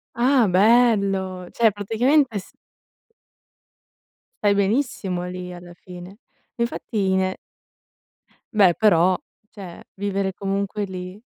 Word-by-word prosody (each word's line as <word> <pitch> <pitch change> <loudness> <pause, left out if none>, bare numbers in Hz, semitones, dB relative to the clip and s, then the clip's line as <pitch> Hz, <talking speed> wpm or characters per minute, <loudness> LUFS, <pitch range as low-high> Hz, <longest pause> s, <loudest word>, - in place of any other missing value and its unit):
Ah, 245 -2 +3
bello, 195 -3 +2
cioè 230 -2 +4
praticamente 230 +6 +1
s 185 - -11 1.9
Stai 205 -1 +4
benissimo 200 -4 -1
lì, 180 0 -7
alla 175 0 -11
fine. 180 0 -11 0.5
Ma 235 - -2
infatti, 205 -5 -2
ne 185 0 0 1.2
Beh, 195 -5 +5
però, 185 -3 +3 0.3
cioè 190 -5 -11
vivere 195 -1 -2
comunque 200 +1 -3
lì 185 +1 -8
195 Hz, 100 wpm, -22 LUFS, 185-215 Hz, 1.9 s, Beh